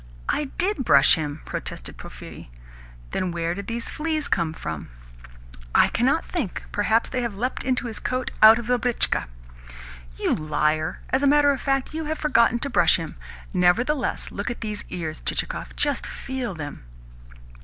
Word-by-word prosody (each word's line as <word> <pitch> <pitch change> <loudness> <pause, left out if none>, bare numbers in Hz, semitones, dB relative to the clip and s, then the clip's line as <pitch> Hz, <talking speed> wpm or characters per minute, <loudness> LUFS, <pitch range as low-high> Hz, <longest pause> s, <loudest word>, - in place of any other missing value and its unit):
"I 300 - 0
DID 370 -6 +1
brush 140 - +6
him," 150 -1 -2
protested - - -5
Porphyri. - - -10 0.6
"Then 185 - -1
where 170 0 -1
did 200 +2 -6
these 230 0 -3
fleas 310 -1 -2
come 170 -3 +1
from?" 80 - -6 0.9
"I - - +6
cannot 265 +7 +1
think. 280 - -3
Perhaps 220 +3 +2
they 255 - -1
have 235 -4 -3
leapt 250 +6 -2
into 255 -1 0
his 225 -2 -4
coat 255 0 -2
out 220 +1 +10
of 235 - -5
the 245 +1 +2
britchka." 245 -1 +1 0.9
"You - - +1
liar! 155 0 0
As 265 - +2
a 285 - +3
matter 290 0 +5
of 270 - -2
fact, 270 0 0
you 320 0 -3
have 310 +1 -2
forgotten 235 -6 +3
to - - -2
brush - - +5
him. - - -4 0.4
Nevertheless, 240 +10 +1
look 200 - -3
at 240 - -5
these 210 -2 -4
ears, 160 -3 -5
Chichikov. - - -2
Just 290 -2 0
feel 255 -7 -4
them." 145 - -7
235 Hz, 165 wpm, -24 LUFS, 170-270 Hz, 0.9 s, out